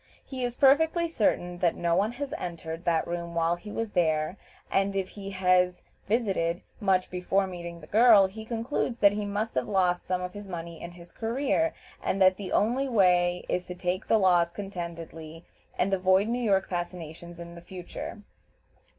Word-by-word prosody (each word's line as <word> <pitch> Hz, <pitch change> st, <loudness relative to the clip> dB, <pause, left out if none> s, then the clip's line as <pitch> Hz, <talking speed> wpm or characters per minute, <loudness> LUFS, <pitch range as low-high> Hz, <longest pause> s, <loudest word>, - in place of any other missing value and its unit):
He 260 Hz, -2 st, -5 dB
is 245 Hz, -1 st, -2 dB
perfectly 320 Hz, +6 st, +4 dB
certain 180 Hz, -, 0 dB
that 175 Hz, -2 st, +2 dB
no 170 Hz, -1 st, +1 dB
one 205 Hz, +5 st, +1 dB
has 280 Hz, +2 st, -5 dB
entered 170 Hz, -1 st, -6 dB
that 165 Hz, -2 st, +2 dB
room 170 Hz, 0 st, -4 dB
while 165 Hz, +1 st, +2 dB
he 210 Hz, +4 st, -10 dB
was 225 Hz, 0 st, -3 dB
there, 160 Hz, -2 st, +1 dB, 0.4 s
and 195 Hz, 0 st, +1 dB
if 190 Hz, -1 st, -1 dB
he 200 Hz, -1 st, -8 dB
has 180 Hz, -1 st, +2 dB, 0.2 s
"visited" 195 Hz, -6 st, 0 dB, 0.2 s
much 190 Hz, -4 st, +1 dB
before 185 Hz, +2 st, +1 dB
meeting 170 Hz, -2 st, -7 dB
the -, -, -11 dB
girl, 215 Hz, +1 st, +6 dB
he 210 Hz, +4 st, -6 dB
concludes 230 Hz, +2 st, -2 dB
that 200 Hz, -3 st, +6 dB
he 205 Hz, 0 st, -3 dB
must 210 Hz, +2 st, -2 dB
have 130 Hz, -, -1 dB
lost 180 Hz, -3 st, +1 dB
some 185 Hz, 0 st, 0 dB
of 180 Hz, 0 st, -5 dB
his 205 Hz, -1 st, -8 dB
money 170 Hz, -2 st, -7 dB
in 170 Hz, 0 st, -7 dB
his 175 Hz, 0 st, -13 dB
career, 275 Hz, +8 st, 0 dB, 0.3 s
and 195 Hz, -, -1 dB
that 185 Hz, -1 st, +5 dB
the 200 Hz, -2 st, -6 dB
only 255 Hz, +6 st, +1 dB
way 180 Hz, -5 st, +3 dB
is 180 Hz, 0 st, -2 dB
to 180 Hz, -, -6 dB
take 180 Hz, +1 st, -2 dB
the 225 Hz, -, +4 dB
loss 175 Hz, -4 st, +4 dB
contentedly, 170 Hz, -4 st, -7 dB, 0.3 s
and 195 Hz, +2 st, +1 dB
avoid 190 Hz, +2 st, +3 dB
New 240 Hz, +2 st, -1 dB
York 195 Hz, -3 st, +2 dB
fascinations 175 Hz, -1 st, -6 dB
in 170 Hz, 0 st, -9 dB
future. 180 Hz, +3 st, -8 dB
185 Hz, 180 wpm, -28 LUFS, 175-210 Hz, 0.4 s, girl